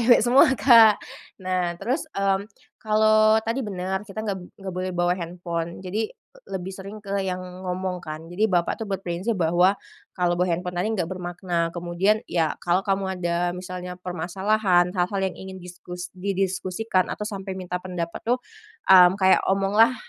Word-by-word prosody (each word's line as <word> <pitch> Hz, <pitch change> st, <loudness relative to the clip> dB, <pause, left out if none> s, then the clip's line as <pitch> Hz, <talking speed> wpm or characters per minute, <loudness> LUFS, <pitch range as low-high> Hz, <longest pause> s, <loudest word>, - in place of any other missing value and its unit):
cewek 235 Hz, -1 st, +5 dB
semua, 255 Hz, +3 st, +6 dB
Kak. 225 Hz, -1 st, +7 dB, 0.5 s
Nah, 180 Hz, -2 st, -1 dB
terus, 260 Hz, -, -2 dB
mmm, 195 Hz, +1 st, +1 dB, 0.3 s
kalau 215 Hz, 0 st, +4 dB
tadi 230 Hz, +4 st, -1 dB
bener, 190 Hz, 0 st, -3 dB
kita 210 Hz, 0 st, -6 dB
nggab 200 Hz, -3 st, -2 dB, 0.2 s
nggak 190 Hz, -2 st, -6 dB
boleh 185 Hz, 0 st, -2 dB
bawa 175 Hz, 0 st, +1 dB
handphone. 170 Hz, -1 st, -4 dB
Jadi, 210 Hz, +4 st, -2 dB
e -, -, -23 dB
lebih 190 Hz, 0 st, -4 dB
sering 195 Hz, +2 st, -8 dB
ke 200 Hz, -1 st, -2 dB
yang 185 Hz, -1 st, -2 dB, 0.3 s
ngomong, 180 Hz, 0 st, -3 dB
kan. 155 Hz, 0 st, -7 dB
Jadi 175 Hz, +6 st, -1 dB
bapak 175 Hz, -2 st, +1 dB
itu 225 Hz, -, -5 dB
berprinsip 190 Hz, +3 st, -2 dB
bahwa 175 Hz, +4 st, +3 dB, 0.4 s
kalau 175 Hz, -1 st, +2 dB
bawa 180 Hz, +1 st, +1 dB
handphone 180 Hz, +1 st, -3 dB
tadi 180 Hz, +5 st, 0 dB
nggak 185 Hz, -6 st, -1 dB
bermakna. 175 Hz, -2 st, -2 dB
Kemudian 175 Hz, +5 st, +1 dB
ya, 165 Hz, -3 st, 0 dB
kalau 175 Hz, +2 st, +1 dB
kamu 195 Hz, -1 st, 0 dB, 0.2 s
ada 170 Hz, 0 st, 0 dB, 0.2 s
misalnya 180 Hz, 0 st, -6 dB
permasalahan, 180 Hz, +1 st, +1 dB
hal-hal 185 Hz, +1 st, 0 dB
yang 190 Hz, -1 st, 0 dB
ingin 190 Hz, 0 st, -8 dB
diskus 180 Hz, 0 st, -8 dB
didiskusikan 190 Hz, +1 st, -1 dB
atau -, -, -5 dB
sampai 195 Hz, -2 st, -5 dB
minta 180 Hz, -1 st, -4 dB
pendapat, 175 Hz, -2 st, -5 dB
oh 250 Hz, +1 st, +1 dB, 0.5 s
mmm, 180 Hz, -1 st, +9 dB
kayak 190 Hz, -1 st, +5 dB
omonglah 200 Hz, +5 st, +4 dB
185 Hz, 160 wpm, -24 LUFS, 180-200 Hz, 0.5 s, mmm